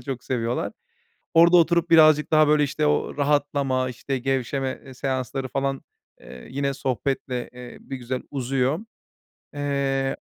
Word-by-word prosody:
çok 125 -1 -6
seviyorlar. 120 -2 -2 0.6
Orada 170 +1 +7
oturup 170 0 +3
birazcık 155 -2 +6
daha, 155 -1 +5
böyle, 150 0 +4
işte, 150 +2 -1
o 150 - 0
rahatlama, 140 -3 +1
işte, 130 +2 -4
gevşeme, 135 +1 -2
eee, 135 - -11
seansları 130 0 -3
falan, 135 +1 -2 0.4
eee, 65 - -12
yine 140 +1 -1
sohbetle, 130 -1 -2
eee, 125 -1 -10
bir 135 - -7
güzel 125 0 -4
uzuyor. 135 +2 0 0.8
Eee, 140 -2 -1
135 Hz, 135 wpm, -24 LUFS, 130-145 Hz, 0.8 s, Orada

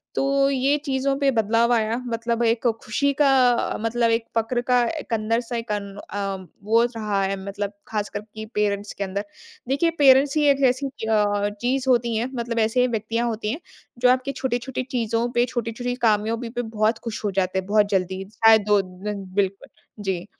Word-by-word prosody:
तो 275 0 +2
ये 275 +2 +2
चीज़ों 275 0 0
पे 280 -1 +3
बदलाव 230 0 +2
आया, 225 0 +1
मतलब 230 0 -1
एक 230 +1 +1 0.2
खुशी 280 +7 +1
का 285 - +5 0.2
अ, 240 - -1
मतलब 230 +1 +1
एक 225 0 0
फक्र 235 +2 0
का 250 -1 +5 0.2
एक 255 - -6
अंदर 225 +1 +1
से 235 -1 -4
कन 200 -1 -3 0.2
अम, 195 -2 -4 0.2
वो 225 +3 +4
रहा 210 -3 -1
है 195 +1 0
मतलब 200 +1 -4
खासकर 210 -1 -3
कि 220 0 -6
पेरेंट्स 205 -1 -1
के 200 - -2
अंदर। 200 +1 -3 0.4
देखिए, 280 +5 +2
पेरेंट्स 275 0 +6
ही 300 - +3
एक 280 0 +2
ऐसी 260 +3 -2
अ, 210 -5 0
चीज़ 255 +2 0
होती 235 -2 +2
हैं 235 +4 -1
मतलब 235 -1 -2
ऐसे 225 +3 +2
व्यक्तियों 230 +1 -1
होती 215 -1 -3
हैं, 285 - -4 0.4
जो 250 0 +5
आपकी 255 +2 0
छोटी-छोटी 260 -1 -3
चीज़ों 230 -2 0
पे, 240 0 +2
छोटे-छोटे 245 0 -3
कामयाबी 225 +3 0
पे 240 +1 -3
बहुत 220 -1 0
खुश 230 -2 -5
हो 205 - 0
जाते 190 0 0
हैं 190 - -6
बहुत 210 0 +3
जल्दी, 190 -1 -1
शायद 225 -2 +5
2 205 -1 +4
दिन 195 +2 -6
बिल्कुल। 195 -1 -1 0.3
जी। 185 -3 -2
230 Hz, 185 wpm, -23 LUFS, 205-245 Hz, 0.4 s, पेरेंट्स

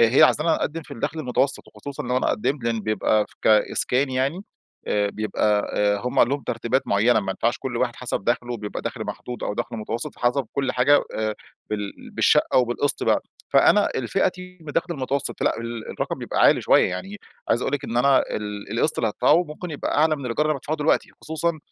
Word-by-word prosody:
هي 115 +3 +6
عايزانا 155 +3 +4
نقدم 165 +2 -3
في 145 - -19
الدخل 145 +6 -3
المتوسط 135 0 0
وخصوصًا 140 -1 -7
لو 125 +1 -1
أنا - - +1
قدمت 130 +3 -1
لأن 115 -1 0
بيبقى 110 0 +1 0.2
كإسكان 125 +5 +2
يعني، 135 +9 -1 0.4
آآ 105 -1 +1
بيبقى 105 0 0
آآ 105 0 +2
هم 125 +4 -3
عندهم 140 +3 +3
ترتيبات 120 +3 -1
معيّنة، 110 +3 +3
ما 95 -1 -3
ينفعش 115 +5 0
كل 125 -2 -4
واحد 120 0 -1
حسب 125 -5 -4
دخله، 120 0 -1
بيبقى 105 -1 -6
دخل - - -4
محدود 125 0 -6
أو 105 - -2
دخل 115 - -4
متوسط، 110 +1 -4
فحسب 125 +1 0
كل 135 -2 -1
حاجة 135 +3 +4
آآ، 110 -1 -1 0.4
بال 105 -1 -5
بالشقة - - +3
أو 130 - +6
بالقسط 120 +4 -1
بقى. - - +2 0.3
فأنا - - +5
الفئتي 180 +6 -2
من 150 -2 -8
دخل 175 -1 -1
المتوسط 135 -1 -2
فلأ، - - +1
ال 115 -1 -6
الرقم - - -3
بيبقى - - -2
عالي - - +6
شوية، - - +4
يعني 195 - -5 0.3
عايز 120 - +2
أقول - - -1
لِك 140 0 -3
إن 120 - -4
أنا 135 +2 +5 0.2
ال 105 -1 -6
القسط 155 - +1
اللي 115 - +1
هادفعه 130 +11 +3
ممكن 160 +3 -8
يبقى 145 -1 -2
أعلى 155 0 +3
من 140 - -8
الإيجار 125 +6 0
اللي 155 - +1
بادفعه 145 +3 -3
دلوقتِ، 150 +1 +2 0.2
خصوصًا 160 +1 -1
125 Hz, 200 wpm, -23 LUFS, 110-145 Hz, 0.4 s, هي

